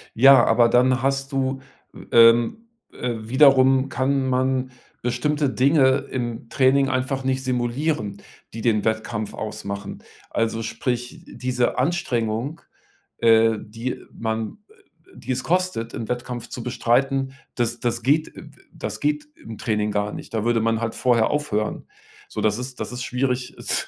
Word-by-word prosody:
Ja, 130 +1 +7
aber 115 +1 +4
dann 125 +1 +3
hast 135 +1 -1
du 135 -1 -1 0.3
w - - -12
ähm, 115 - +5 0.3
äh, 125 -1 -3
wiederum 130 +2 +4
kann 130 +1 0
man 130 0 0 0.3
bestimmte 140 +4 0
Dinge 135 0 +3
im 120 -2 -4
Training 135 +1 +3
einfach 130 +1 -1
nicht 130 0 -1
simulieren, 125 -3 -1 0.4
die 115 - -6
den 110 -3 +2
Wettkampf 110 -1 -2
ausmachen. 100 -2 -6 0.3
Also, 115 0 -1
sprich, 125 +7 -3
diese 125 -1 -1
Anstrengung, 125 -1 -1 0.6
äh, 115 -1 +5
die 115 +5 -6
man 110 -1 -3
äh, - - -21 0.4
die - - -6
es 130 0 -2
kostet, 180 -10 -1
im 115 - -5
Wettkampf 120 -1 -4
zu 125 - -6
bestreiten, 135 +2 0 0.2
das 120 -1 -1
das 120 -1 -2
geht 150 +5 +1
äh, - - -9
äh, - - -13 0.2
das - - -5
geht 300 0 -1
im 115 -1 -9
Training 105 -1 -1
gar 105 0 -1
nicht. - - -9
Da 110 -2 -1
würde 120 -1 +2
man 115 0 +1
halt 115 -1 -2
vorher 120 -3 +2
aufhören. 120 -8 -2 0.4
So, - - -4
das 105 -1 +1
ist 125 0 -7
das - - -4
ist 125 0 -5
schwierig, 125 -2 -2
es - - -2
125 Hz, 155 wpm, -23 LUFS, 115-135 Hz, 0.6 s, Ja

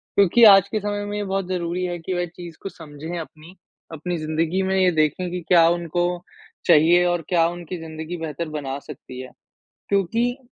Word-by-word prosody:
क्योंकि 200 +4 +5
आज 195 -2 +8
के 215 - -1
समय 205 0 -3
में 205 0 -4
ये 205 - -2
बहुत 195 -1 -2
ज़रूरी 180 0 -2
है 175 -1 -3
कि 175 +3 -4
वह 175 0 0
चीज़ 175 -1 -11
को 195 - -5
समझे 160 0 -8
अपनी, 160 +1 -10 0.4
अपनी 175 +3 -3
ज़िंदगी 160 +3 -1
में 190 0 0
ये 185 -1 +4
देखें 155 +3 0
कि 180 - -4
क्या 170 -2 +6
उनको 175 0 0 0.6
चाहिए 170 +1 +5
और 175 -1 +1
क्या 170 -2 +3
उनकी 175 +1 -7
ज़िंदगी 160 +1 -6
बेहतर 160 0 -5
बना 140 -3 -4
सकती 130 -3 -11
है। 130 - -10 0.6
क्योंकि 230 +6 +1
175 Hz, 190 wpm, -22 LUFS, 160-185 Hz, 0.6 s, आज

